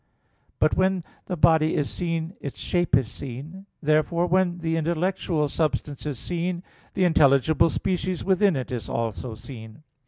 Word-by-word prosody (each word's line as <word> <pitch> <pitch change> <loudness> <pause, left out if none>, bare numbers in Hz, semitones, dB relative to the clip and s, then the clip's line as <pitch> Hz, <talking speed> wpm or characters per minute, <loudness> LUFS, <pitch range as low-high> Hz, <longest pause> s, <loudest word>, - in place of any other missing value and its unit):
But 155 - +3
when 185 -1 +2 0.2
the 180 - -3
body 160 0 +4
is 145 - +1
seen 165 0 -3
its 140 - -6
shape 175 -1 +2
is 130 -4 -1
seen. 145 - -8 0.2
Therefore, 155 +3 +2
when 180 0 +1
an 170 - -9
intellectual 165 -1 0
substance 150 -1 -2
is 145 -4 -3
seen, 175 +4 -3 0.3
the 190 - +2
intelligible 155 -1 +4
species 185 +1 -1
within 190 -1 +3
it 130 -2 -4
is 120 -3 -4
also 115 +1 -3
seen. 110 +2 -11
160 Hz, 150 wpm, -25 LUFS, 140-180 Hz, 0.3 s, body